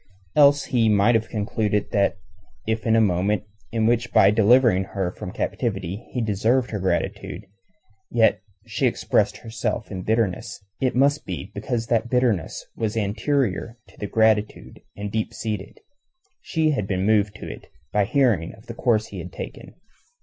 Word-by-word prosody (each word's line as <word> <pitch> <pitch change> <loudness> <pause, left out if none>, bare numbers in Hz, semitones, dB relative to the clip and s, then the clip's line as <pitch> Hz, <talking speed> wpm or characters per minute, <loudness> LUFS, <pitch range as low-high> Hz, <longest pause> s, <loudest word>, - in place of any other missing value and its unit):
Else 145 -1 +6
he 115 -3 +2
might 105 +3 +4
have 115 -1 +1
concluded 105 -1 -1
that 100 -3 +2 0.5
if 110 +1 -2
in 110 - +4
a - - +5
moment 100 0 +1 0.3
in 115 -1 +1
which 120 +1 +1
by 95 - +6
delivering 110 -2 +4
her 95 -2 -3
from 90 - -7
captivity 100 -2 -3
he 125 - -2
deserved 115 +4 +1
her 105 - -2
gratitude, 95 +1 -2 0.6
yet 110 -5 +3 0.2
she - - 0
expressed - - +1
herself 110 -1 -4
in 95 -2 -4
bitterness, 105 -3 -1 0.2
it 130 -2 +1
must 140 +3 +3
be 95 - -6
because 115 +3 -2
that 115 0 0
bitterness 120 - 0
was 110 0 -2
anterior 110 - -1
to - - -21
the 105 - -4
gratitude 110 -1 +1 0.2
and 100 0 -5
deep 110 0 -2
seated. 105 -4 -4 0.6
She 160 -2 +1
had 120 -9 -1
been 95 -1 -1
moved 105 -1 +2
to - - -8
it - - -9 0.3
by 105 -1 +3
hearing 115 - +1
of 110 - -19
the 115 - -7
course 115 -2 +1
he - - -7
had - - -7
taken. - - -9
110 Hz, 165 wpm, -23 LUFS, 100-120 Hz, 0.6 s, Else